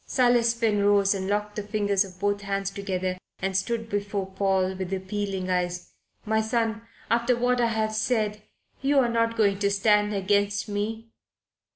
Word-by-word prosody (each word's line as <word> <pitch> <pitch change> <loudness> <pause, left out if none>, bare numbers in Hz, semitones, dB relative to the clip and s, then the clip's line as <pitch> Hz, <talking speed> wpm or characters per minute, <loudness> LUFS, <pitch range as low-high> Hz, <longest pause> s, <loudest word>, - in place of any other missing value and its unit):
Silas 240 -2 +3
Finn 220 -3 +1
rose 200 -1 +4
and 190 -1 -3
locked 210 +1 -1
the 210 - -2
fingers 205 -1 +1
of 185 -2 -13
both 205 0 0
hands 195 0 -2
together 185 -2 -3 0.2
and 195 0 -3
stood 225 +3 -1
before 205 -2 -2
Paul, 190 -1 0
with 190 -1 -5
appealing 190 0 -3
eyes. 180 0 -2 0.3
"My 220 0 +2
son, 225 0 -1 0.3
after 235 +1 +2
what 245 0 +2
I 235 - +3
have 220 -1 -1
said, 215 -2 0 0.4
you 280 +1 +2
are 250 -3 +4
not 230 0 0
going 200 -3 +2
to 200 -1 +2
stand 210 +1 +3
against 200 +1 +1
me?" 220 +2 -4
205 Hz, 170 wpm, -26 LUFS, 195-225 Hz, 0.4 s, rose